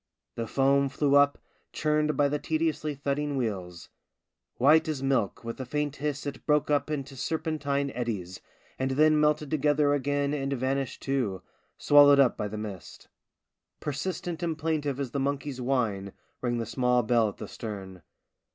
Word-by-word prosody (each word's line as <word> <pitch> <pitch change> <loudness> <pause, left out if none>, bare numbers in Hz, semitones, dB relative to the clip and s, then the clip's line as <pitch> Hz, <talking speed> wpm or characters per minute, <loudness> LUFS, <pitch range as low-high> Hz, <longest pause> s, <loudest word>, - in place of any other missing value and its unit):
The 115 -1 -4
foam 140 +2 +2
flew 140 +1 0
up, 145 0 +5 0.3
churned 150 -1 0
by 145 - +4
the 145 +1 -1
tediously 155 -1 -1
thudding 140 +1 -2
wheels; 95 -8 -4 0.7
white 155 +5 +5
as 145 -4 -3
milk, 130 -8 0
with 115 +2 -6
a - - -2
faint 145 +2 -2
hiss 145 0 -3
it 140 -3 -6
broke 150 -1 +2
up 145 +1 +1
into 140 -2 -4
serpentine 145 -2 -2
eddies, 105 -7 -4 0.4
and 130 0 0
then 155 +3 +4
melted 150 -1 +1
together 145 -1 +2
again 145 +1 0
and 140 -1 -2
vanished 135 0 -2
too, 125 -9 -1 0.3
swallowed 145 -1 +7
up 135 -3 +5
by 105 - -3
the 105 +1 -6
mist. 105 -4 -8 0.7
Persistent 165 +3 -4
and 165 -3 -2
plaintive 150 -4 -1
as 135 -4 -3
the 140 - -2
monkey's 140 -1 -2
whine 110 -7 -1 0.3
rang 120 -1 -1
the 115 - -2
small 125 +1 +1
bell 115 -1 +3
at - - -11
the - - -7
stern. 95 -5 -7
140 Hz, 160 wpm, -28 LUFS, 125-150 Hz, 0.7 s, swallowed